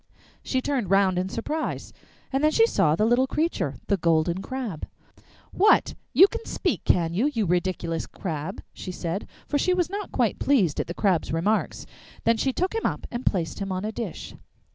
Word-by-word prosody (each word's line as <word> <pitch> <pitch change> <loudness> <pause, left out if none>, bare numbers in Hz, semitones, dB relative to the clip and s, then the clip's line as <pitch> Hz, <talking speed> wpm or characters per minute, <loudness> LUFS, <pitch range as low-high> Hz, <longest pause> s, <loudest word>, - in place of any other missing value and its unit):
She 260 - 0
turned 260 -10 -1
round 195 -2 +3
in 185 +1 -2
surprise, 300 +10 -3 0.4
and 270 +2 +1
then 305 - +6
she 450 +8 +5
saw 180 - +2
the 210 - +2
little 245 +3 +3
creature, 300 - -1
the 200 - +1
Golden 170 +1 +1
Crab. 240 - -5 0.6
'What! 420 +3 +4 0.2
You 380 - +8
can 465 +2 -6
speak, - - -2
can 170 -2 +2
you, 220 +11 +2
you 225 -6 0
ridiculous 175 -2 -1
crab?' 165 0 -5
she 185 - -7
said, 175 +2 -4 0.2
for 290 - 0
she 365 +5 +2
was 355 0 0
not 405 +1 -4
quite - - 0
pleased 200 - +2
at - - -1
the 170 - -5
Crab's 185 -6 +1
remarks. 185 +7 0 0.4
Then 230 0 +3
she 265 - +1
took 370 - -1
him 450 - 0
up - - -4
and 240 +1 -5
placed 175 -5 0
him 195 -1 -3
on 185 +2 -2
a 215 - -2
dish. 220 -5 -6
205 Hz, 190 wpm, -25 LUFS, 175-275 Hz, 0.6 s, You